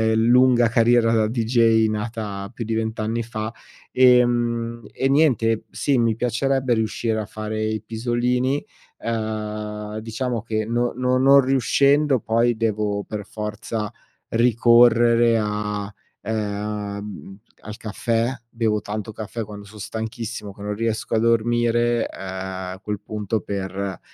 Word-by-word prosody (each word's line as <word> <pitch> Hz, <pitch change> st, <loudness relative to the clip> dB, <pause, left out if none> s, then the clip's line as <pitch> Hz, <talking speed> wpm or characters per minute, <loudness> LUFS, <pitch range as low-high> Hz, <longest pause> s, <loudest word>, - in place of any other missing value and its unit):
lunga 120 Hz, +1 st, +5 dB
carriera 115 Hz, 0 st, +4 dB
da 110 Hz, -1 st, +3 dB
DJ 115 Hz, -1 st, +3 dB
nata 105 Hz, -2 st, -4 dB
più 115 Hz, -, -5 dB
di 110 Hz, 0 st, -2 dB
20 110 Hz, 0 st, -2 dB
anni 115 Hz, +2 st, -1 dB
fa. 110 Hz, -1 st, -4 dB, 0.4 s
Ehm, 120 Hz, -2 st, +3 dB
e 135 Hz, -, 0 dB
niente 125 Hz, -7 st, +2 dB
sì, 140 Hz, -2 st, +1 dB
mi 115 Hz, -2 st, +2 dB
piacerebbe 125 Hz, +2 st, 0 dB
riuscire 110 Hz, 0 st, -1 dB
a 110 Hz, -, -3 dB
fare 110 Hz, +1 st, -5 dB
i 110 Hz, 0 st, -2 dB
pisolini, 125 Hz, +4 st, 0 dB, 0.4 s
uhm, 105 Hz, -1 st, -4 dB
diciamo 115 Hz, +1 st, -3 dB
che 110 Hz, -1 st, -2 dB
no 120 Hz, +2 st, 0 dB
no 125 Hz, +1 st, +1 dB
non 135 Hz, +2 st, +6 dB
riuscendo 135 Hz, +2 st, +3 dB
poi, 115 Hz, +1 st, +2 dB
devo 105 Hz, -2 st, -1 dB
per 105 Hz, -1 st, -6 dB
forza 105 Hz, 0 st, -4 dB, 0.4 s
ricorrere 115 Hz, 0 st, +5 dB
a, 105 Hz, -1 st, -3 dB, 0.3 s
ehm, 105 Hz, -2 st, -4 dB, 0.2 s
al 110 Hz, 0 st, -8 dB
caffè. 115 Hz, +2 st, -1 dB, 0.2 s
Bevo 115 Hz, -3 st, 0 dB
tanto 105 Hz, +1 st, -5 dB
caffè 110 Hz, +2 st, -5 dB
quando 105 Hz, -1 st, -10 dB
son 105 Hz, +1 st, -13 dB
stanchissimo 110 Hz, 0 st, -5 dB
che 100 Hz, -, -14 dB
non 105 Hz, 0 st, -3 dB
riesco 115 Hz, 0 st, -2 dB
a -, -, +3 dB
dormire, 120 Hz, +1 st, +2 dB
uhm, -, -, -12 dB
a 95 Hz, 0 st, -5 dB
quel 105 Hz, -2 st, -4 dB
punto 105 Hz, 0 st, -3 dB
per 95 Hz, -1 st, -4 dB
110 Hz, 130 wpm, -22 LUFS, 105-120 Hz, 0.4 s, non